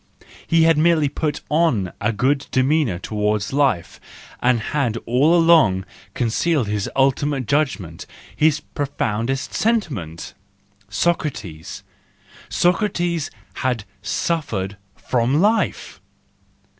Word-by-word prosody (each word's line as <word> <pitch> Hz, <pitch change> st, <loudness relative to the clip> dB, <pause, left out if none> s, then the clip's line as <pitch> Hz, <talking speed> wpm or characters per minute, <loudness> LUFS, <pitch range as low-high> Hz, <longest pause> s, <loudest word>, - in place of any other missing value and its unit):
He 165 Hz, -1 st, +4 dB
had 165 Hz, -2 st, +4 dB
merely 160 Hz, -3 st, +3 dB
put 150 Hz, +1 st, -2 dB
on 145 Hz, -, +1 dB
a 105 Hz, +2 st, +1 dB
good 135 Hz, +6 st, 0 dB
demeanour 130 Hz, -, +1 dB
towards 105 Hz, +3 st, -2 dB
life, 135 Hz, -11 st, 0 dB, 0.4 s
and 125 Hz, -1 st, +3 dB
had 120 Hz, -1 st, -1 dB
all 140 Hz, +8 st, +3 dB
along 155 Hz, -, +4 dB, 0.3 s
concealed 125 Hz, +3 st, +1 dB
his 105 Hz, -1 st, -2 dB
ultimate 135 Hz, 0 st, +1 dB
judgment, 105 Hz, -, -1 dB, 0.3 s
his 155 Hz, -1 st, +2 dB
profoundest 135 Hz, -2 st, -3 dB
sentiment! 135 Hz, -, -2 dB, 0.6 s
Socrates, 105 Hz, -, -2 dB, 0.7 s
Socrates 175 Hz, -3 st, +1 dB, 0.3 s
had 125 Hz, -5 st, -1 dB, 0.2 s
suffered 110 Hz, -, -2 dB, 0.2 s
from 125 Hz, +4 st, 0 dB
life! 215 Hz, +4 st, 0 dB
135 Hz, 95 wpm, -21 LUFS, 105-160 Hz, 0.7 s, He